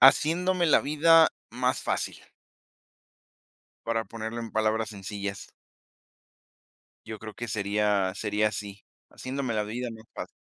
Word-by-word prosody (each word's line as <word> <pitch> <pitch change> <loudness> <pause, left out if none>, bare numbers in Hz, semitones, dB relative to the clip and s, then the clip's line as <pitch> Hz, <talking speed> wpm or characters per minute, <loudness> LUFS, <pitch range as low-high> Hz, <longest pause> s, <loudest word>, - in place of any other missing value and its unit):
Haciéndome 170 +7 +5
la 155 - +6
vida 160 +2 +5 0.2
más - - 0
fácil. - - -2 1.6
Para 115 -1 0
ponerlo 115 +1 -5
en 115 -1 -6
palabras 110 0 +1
sencillas. 100 -1 -5 1.6
Yo 110 -1 -6
creo 110 -1 -8
que 120 - -5
sería 105 -2 +1
sería 105 0 +1
así, 100 -1 -6 0.3
haciéndome 130 -2 -3
la 105 - +1
vida 120 +4 -4
más 110 -1 -11
fácil. - - -6
110 Hz, 120 wpm, -28 LUFS, 105-130 Hz, 1.6 s, la